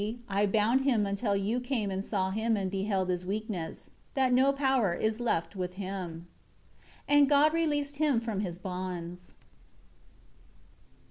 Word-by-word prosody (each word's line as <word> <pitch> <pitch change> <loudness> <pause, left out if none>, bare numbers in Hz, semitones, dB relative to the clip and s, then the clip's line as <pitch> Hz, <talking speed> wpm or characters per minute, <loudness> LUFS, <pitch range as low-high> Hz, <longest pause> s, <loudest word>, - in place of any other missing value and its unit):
10 205 - -1
See, 235 +2 -6
I 200 +1 +2
bound 220 +6 +3
him 240 -7 +2
until 200 +1 0
you 205 +5 0
came 245 -5 -2
and 190 +1 -2
saw 190 -3 -1
him 220 +2 +1
and 190 -2 -2
beheld 195 -1 -1
his 180 0 -1
weakness, 195 -3 -4 0.2
that 260 -2 +3
no 265 +2 +5
power 265 -9 +1
is 220 +4 -1
left 170 -7 -1
with 180 -1 -4
him." 185 -4 -5 0.8
11 290 0 +6
And 280 - +5
God 295 +2 +5
released 290 -3 0
him 295 -5 +3
from 225 -4 -3
his 180 -4 -3
bonds. 180 -1 -6
205 Hz, 160 wpm, -30 LUFS, 185-250 Hz, 0.8 s, 11